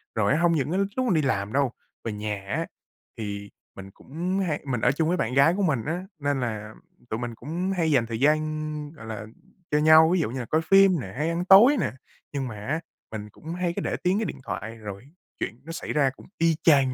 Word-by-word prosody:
Rồi 110 -1 +2
á 150 - +2
hông 170 0 +4
những 150 -1 0
cái 185 - +1 0.2
lúc 255 - +1
mà 225 - +3
đi 155 - +3
làm 105 -7 -1
đâu, 140 -2 +2 0.3
về 115 - -3
nhà 105 -1 -4
á - - -1 0.5
thì 100 -2 -5 0.3
mình 95 0 -10
cũng 175 - -3
hay 150 -3 -1
mình 125 -5 -2
ở 125 - +4
chung 155 +3 0
với 180 +2 +1
bạn 120 - -1
gái 140 +5 +5
của 200 - +1
mình 140 -10 +1
á, 175 +5 -3
nên 145 -1 0
là 110 -3 -4 0.4
tụi 110 - -2
mình 120 -1 -4
cũng 170 - -3
hay 165 -2 +2
dành 130 -5 +3
thời 115 -1 -4
gian, 155 +1 0
gọi 135 -8 -12
là, 110 -1 -6 0.5
cho 150 - +3
nhau, 155 +1 +7
ví 185 - +3
dụ 145 -9 -1
như 130 - -4
là 120 - -4
coi 155 +7 +1
phim 195 +1 +5
nè, 95 -5 -8
hay 155 +3 0
ăn 170 +1 -1
tối 220 +10 +8
nè. 130 - 0 0.4
Nhưng 135 -2 -2
mà 115 - -6
á 130 +10 -2 0.3
mình 105 -1 -6
cũng 160 +10 -8
hay 180 -1 -1
cứ - - -2
để - - -1
tiếng 180 +2 +2
cái 225 - -1
điện - - -5
thoại 110 +1 -5
rồi 105 0 -8 0.3
chuyện 115 - -4
nó 165 - -8
xảy 165 - -4
ra 140 -3 +3
cũng - - -15
y 165 -1 +3
chang 135 -5 +5
145 Hz, 250 wpm, -26 LUFS, 115-165 Hz, 0.5 s, tối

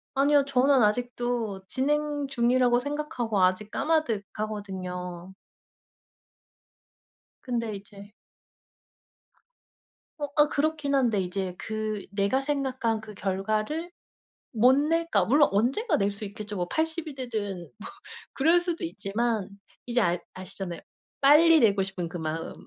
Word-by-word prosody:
아니요. 280 0 +4
저는 270 -1 +4
아직도 235 -3 -1
진행 290 +1 0
중이라고 245 -1 +3
생각하고 250 -7 -2
아직 185 +3 +1
까마득하거든요. 195 - -3 2.1
근데 230 -4 -2
이제 200 +1 -12 2.1
어 290 - -2
아 295 0 +5
그렇긴 300 -1 -1
한데 235 -6 +2
이제 185 0 -3
그 215 -2 -4
내가 200 +6 +1
생각한 260 -6 -1
그 215 -1 -10
결과를 215 - -2 0.7
못 250 +4 +6
낼까 305 - +1
물론 290 +7 +4
언젠가 270 - +1
낼 200 0 +1
수 200 +1 -7
있겠죠. 210 0 -7
뭐 175 - -1
80 320 - -2
이 285 - -7
되든 205 - -4
뭐 215 - -9 0.4
그럴 325 +6 +4
수도 345 -1 -4
있지만 220 - -2 0.4
이제 245 0 +1
알 175 -1 +1
아시잖아요, 185 -1 -7 0.4
빨리 315 +3 +7
내고 200 -5 +4
싶은 185 -3 -4
그 175 - -6
마음. 160 0 -4
230 Hz, 245 characters per minute, -27 LUFS, 200-285 Hz, 2.1 s, 빨리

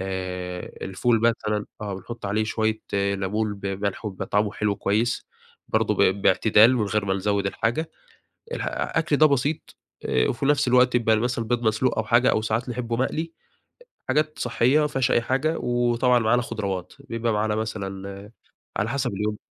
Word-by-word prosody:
آآ 90 -1 -4
الفول 110 +4 +1
مثلًا 105 -3 +1 0.2
آه، 105 -2 -4
بنحُط 110 +4 -7
عليه 105 +2 0
شوية 110 0 -1
لَمُون 100 +2 0
بملح، 100 +1 -3
وبيبقى 95 -2 -4
طعمه 105 +1 +1
حلو 105 -1 -1
كويس. 110 +6 0 0.4
برضه - - +1
ب 95 +1 +2
باعتدال 110 +4 +5
من 110 - +1
غير 105 0 0
ما 95 -1 0
نزوّد 100 0 0
الحاجة. 120 +11 -1 0.6
الح - - -3
أكل 160 -2 0
ده 155 - +6
بسيط، 145 +2 -1 0.3
آآ 65 0 +1
وفي 135 +3 -1
نفس 145 -3 +3
الوقت 125 0 +4
يبقى 115 -2 +3
مثلًا 120 +1 -1
البيض 120 +1 -1
مسلوق 110 +2 +1
أو 110 - 0
حاجة، 120 +4 +4
أو 110 - +1
ساعات 110 +3 -1
نحبه 120 -1 -3
مقلي، 160 +6 -2 0.8
حاجات 155 0 0
صحّية، 130 +6 +2
ما 150 - +2
فيهاش 135 -4 0
أي 120 - +3
حاجة، 135 +7 0
وطبعًا 120 0 +2
معانا 120 +2 +2
خضراوات، 100 -7 -4
بيبقى 115 -1 -2
معانا 105 0 0
مثلًا 100 -1 -5 0.5
على 105 +3 0
حسب 130 -3 -1
اليوم. 105 +1 -2
110 Hz, 165 wpm, -24 LUFS, 100-120 Hz, 0.8 s, ده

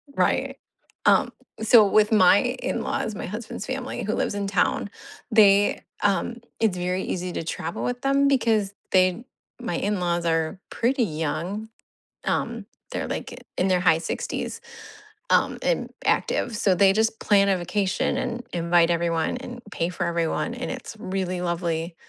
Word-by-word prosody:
Right. - - +1 0.5
Um, - - +4 0.3
so 220 -1 +7
with 210 +2 +3
my 195 -2 +6
in-laws, 245 -3 -2
my 200 - -5
husband's 215 +3 -6
family 260 0 -4
who 215 - -1
lives - - -1
in 200 -1 -2
town, 195 +1 +1 0.4
they 205 -2 +5 0.2
um, 205 +4 +1 0.2
it's 220 -5 +2
very 180 +1 -1
easy 180 0 -3
to - - -3
travel 165 +1 -4
with 245 0 -2
them 275 +1 +3
because 225 -7 +2 0.2
they 185 +5 +3 0.4
my 225 -8 -3
in-laws 175 -3 -1
are 165 +2 0
pretty 250 +2 +1
young. 170 +5 -3 0.5
Um, - - -2 0.3
they're, - - -3
like, - - -6
in 185 - +2
their 185 -1 +3
high 165 -3 +4
'60s, 475 - -4 0.7
um, - - +3
and - - 0 0.2
active. 235 -3 +1
So, 195 -4 +3
they 195 +1 +5
just 220 +2 +1
plan 200 -1 +4
a 195 - +3
vacation 185 +5 -1
and 250 -2 -3
invite 170 0 +3
everyone 170 +2 0
and 245 -1 -8
pay 170 -3 -1
for 180 - -2
everyone, 170 +6 -1
and 250 +1 -5
it's 255 -3 -7
really 185 -3 -3
lovely. 170 -1 -2
195 Hz, 150 wpm, -24 LUFS, 175-225 Hz, 0.7 s, so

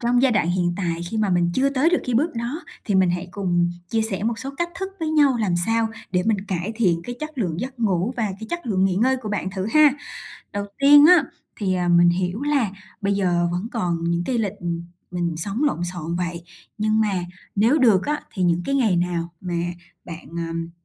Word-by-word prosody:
trong 245 +1 +2
giai 265 - +4
đoạn 195 -5 +2
hiện 175 -1 +1
tại 170 -3 -2
khi 225 - -3
mà 215 -2 +1
mình 175 -1 +2
chưa 275 +1 +2
tới 280 +5 +2
được 355 - +3
cái 250 - -1
bước 300 +8 +2
đó 240 +9 -4 0.2
thì 205 - -1
mình 185 -2 +4
hãy 175 +1 -3
cùng 175 -3 0 0.2
chia 225 -1 +1
sẻ 200 -3 -3
một 230 0 -1
số 270 - -5
cách 345 0 0
thức 385 - -2
với 315 -1 -1
nhau 290 -5 +4
làm 180 -5 +1
sao 225 0 +2 0.2
để 180 0 +2
mình 215 -4 +2
cải 190 +3 -2
thiện 180 -7 +2
cái 245 - -6
chất 305 -2 -6
lượng 180 -5 -1
giấc 255 -1 -6
ngủ 200 +2 +1
và 235 - -1 0.2
cái 220 - -6
chất 345 -6 -4
lượng 190 -3 +2
nghỉ 190 - +2
ngơi 260 +5 +3
của 230 -4 -6
bạn 200 -2 -2
thử 190 +1 -3
ha. 305 -2 +7 0.6
Đầu 205 0 -3
tiên 290 +2 +8
á 350 -3 +7 0.3
thì, 190 -3 0
à, 180 -1 0
mình 175 0 +6
hiểu 180 +6 -1
là 285 -8 +1 0.3
bây 200 0 0
giờ 175 -3 +1
vẫn 185 +6 -3
còn 175 -7 -1
những 170 +1 0
cái 250 -2 -1
lịch, 210 -3 0
ừm, 170 -2 -3 0.3
mình 175 -2 -2
sống 200 - -2
lộn 175 - 0
xộn 175 -1 -4
vậy, 170 -1 -3 0.4
nhưng 215 +1 +2
mà 210 -2 +1 0.4
nếu 235 +9 +4
được 215 -8 +4
á 295 0 0
thì 185 - -2
những 175 0 +2
cái 275 - -1
ngày 220 -10 +3
nào 170 -1 -1
mà 180 -2 -4 0.5
bạn, 170 0 -9 0.2
ờm 165 0 -4
200 Hz, 235 wpm, -23 LUFS, 175-245 Hz, 0.6 s, tiên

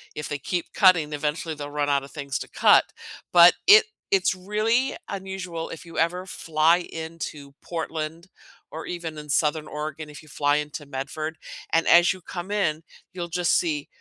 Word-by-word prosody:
if 150 - -5
they 145 - -2
keep 175 +5 -4
cutting, 175 -6 +4
eventually, 150 +2 -2
they'll 145 0 -7
run 145 -1 -1
out 140 -1 +2
of 140 - -12
things 140 -3 -4
to - - -7
cut. - - +5 0.5
But 175 0 +9
it 430 +3 +9 0.3
it's 185 -1 +3
really 215 +7 0
unusual 190 -4 -5
if 165 - -9
you 165 - -10
ever 175 +3 0
fly 165 -2 +2
into 160 -4 -7
Portland, 165 0 -5 0.4
or 160 - -7
even 170 -3 -5
in 150 0 -9
Southern 150 +2 +1
Oregon, 155 +1 -6
if 150 - -11
you 155 - -18
fly 145 0 +1
into 150 0 -5
Medford. 150 +3 -5 0.3
And 165 - +2
as 175 +1 +6
you 185 - -13
come 175 +3 -7
in, 165 -7 0 0.3
you'll 175 -2 -5
just 175 -1 +2
see 150 -4 -1
160 Hz, 175 wpm, -25 LUFS, 150-175 Hz, 0.5 s, But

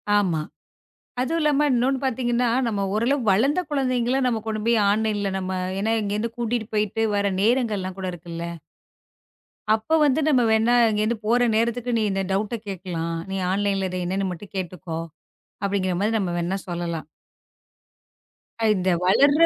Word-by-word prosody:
ஆமா. 180 -7 +2 0.8
அதுவும் 325 +6 0
இல்லாம, 295 0 +3
இன்னொன்னு 260 +2 +2
பாத்தீங்கன்னா, 245 -1 +1 0.2
நம்ம 205 -3 -1
ஓரளவு 245 +5 +1
வளர்ந்த 275 - +3
குழந்தைங்கள 255 -2 +1
நம்ம 230 -3 0
கொண்டு 215 -1 -2
போய் 235 -1 +4
ஆன்லைன்ல 210 -1 0
நம்ம 190 0 -3 0.3
ஏன்னா 220 +2 +1
இங்க 205 0 -2
இருந்து 230 +2 -2
கூட்டிட்டு 235 -1 -1
போயிட்டு 210 +1 0
வர 200 -1 +1
நேரங்கள் 230 -2 +2
எல்லாம் 185 0 -5
கூட 185 -1 -3
இருக்குல்ல 170 0 -6 1.3
அப்போ 220 +8 -1
வந்து 285 +2 +3
நம்ம 265 -5 +4
வேணா 220 +2 +3 0.2
இங்க 210 -1 0
இருந்து 225 +1 0
போற 240 +3 +3
நேரத்துக்கு, 235 +2 0
"நீ - - +1
இந்த 195 0 0
டவுட் 210 +4 0
கேட்கலாம். 170 -3 -4
நீ 195 - -2
ஆன்லைன் 200 0 +1
-ல 190 - 0
இத 185 - -5
என்னன்னு 190 +1 -1
மட்டும் 195 +4 -9
கேட்டுக்கோ," 175 -2 -4 0.6
அப்படிங்கற 190 -2 0
மாரி 215 +2 +1
நம்ம 180 -4 -1
வேணா 175 +3 -1
சொல்லலாம். 170 -3 -4 1.7
இந்த 185 -1 0 0.2
வளர்ற 285 - +5
215 Hz, 155 wpm, -24 LUFS, 190-240 Hz, 1.7 s, வளர்ற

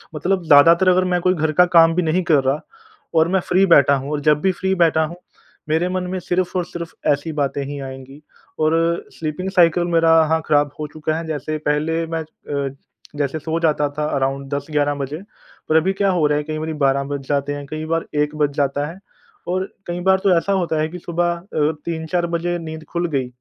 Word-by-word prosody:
मतलब 180 +4 0
ज़्यादातर 165 +5 +6
अगर 185 0 +4
मैं 180 - +2
कोई 185 +1 +3
घर 160 -3 0
का 180 +4 +5
काम 165 0 +7
भी 180 - +2
नहीं 165 +3 +1
कर 145 -3 +4
रहा 135 +3 +1 0.6
और 160 0 +4
मैं 190 - +3
फ्री 185 +2 +4
बैठा 140 -6 +5
हूँ 135 +2 -5
और 150 - -1
जब 150 0 +3
भी 190 - +2
फ्री 190 +1 -1
बैठा 165 -3 +3
हूँ 165 +3 -8 0.5
मेरे 160 +3 +1
मन 185 0 -2
में 185 - -2
सिर्फ़ 180 +1 -1
और 180 - 0
सिर्फ़ 170 -1 -7 0.2
ऐसी 145 +3 -1
बातें 140 -1 -1
ही 145 +1 -6
आएँगी। 135 +1 -9 0.4
और 155 0 +2 0.4
स्लीपिंग 165 +4 -4
साइकिल 175 -2 +4
मेरा 165 -1 +3
हाँ, 160 +1 +1
ख़राब 145 -1 +2
हो 150 - -3
चुका 155 0 -2
है। 165 - -5
जैसे 155 0 -3
पहले 160 +3 0
मैं 165 0 -3 0.5
अ, 135 - -14 0.4
जैसे 145 +1 -2
सो 160 +2 -2
जाता 150 -3 +1
था 150 - 0
अराउंड 135 0 -1
10-11 145 0 0
बजे। 140 +1 -4 0.5
पर 155 - +2
अभी 175 +5 +3
क्या 195 0 +1
हो 175 -4 +1
रहा 150 0 +1
है 150 - -2
कई 155 +1 -4
बारी 160 0 -3
12 140 -2 +1
बज 140 -1 -6
जाते 145 0 -1
हैं, 145 0 -6
कई 155 +2 -5
बार 165 +1 -1
1 150 +1 0
बज 150 -1 +1
जाता 145 0 0
है। 165 +4 -9 0.5
और 185 +1 0 0.2
कई 175 0 -3
बार 190 +1 +3
तो 190 -3 +4
ऐसा 200 +4 0
होता 175 -5 0
है 155 - 0
कि 180 +2 -8
सुबह 175 0 -1
अ, 160 -4 -1
3-4 170 +1 -2
बजे 170 +1 -1
नींद 160 -1 -7
खुल 175 0 -1
गई। 135 -4 -1
160 Hz, 220 wpm, -20 LUFS, 145-175 Hz, 0.6 s, काम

